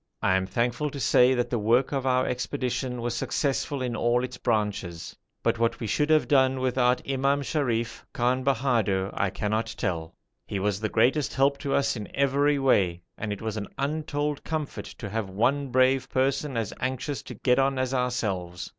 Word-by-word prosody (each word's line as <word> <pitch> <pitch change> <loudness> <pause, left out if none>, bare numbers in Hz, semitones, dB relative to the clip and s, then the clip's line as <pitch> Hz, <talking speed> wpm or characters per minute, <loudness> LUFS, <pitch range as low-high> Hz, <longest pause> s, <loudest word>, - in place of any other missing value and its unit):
I 95 - +3
am 95 0 0
thankful 120 +7 0
to 140 - -7
say 125 0 +4
that 120 -1 -1
the 120 - +1
work 120 +5 +2
of 135 -2 -1
our 130 0 +3
expedition 125 -1 -2
was 120 -1 -1
successful 140 +1 -1
in 120 -2 -2
all 120 +2 +2
its 125 -1 -5
branches; 105 -8 -2 0.3
but - - +1
what 115 0 +1
we - - -4
should 150 +8 0
have 155 -1 +4
done 130 -2 +3
without 125 -1 +1
Imam 135 +1 +1
Sharif, 120 -6 -1
Khan 125 +2 0
Bahadur, 115 -8 +1
I 100 - 0
cannot 105 +3 -1
tell. 80 -2 -3 0.3
He 100 - -3
was 100 0 0
the 110 0 -2
greatest 135 +3 +2
help 140 +1 +2
to 140 -2 -1
us 140 -1 +1
in 105 -3 -6
every 140 +1 +2
way, 95 -10 +2
and 105 -1 -4
it 105 +1 -5
was 110 -1 -3
an 105 -2 -4
untold 150 0 -2
comfort 155 -3 -4
to 105 - -8
have 105 -1 -3
one 130 +9 +1
brave 130 +1 +3
person 135 0 0
as 110 -4 -2
anxious 130 +2 -2
to - - -9
get 125 0 +2
on 135 0 +2
as 130 0 -1
ourselves. 100 -9 -2
125 Hz, 190 wpm, -26 LUFS, 110-135 Hz, 0.3 s, say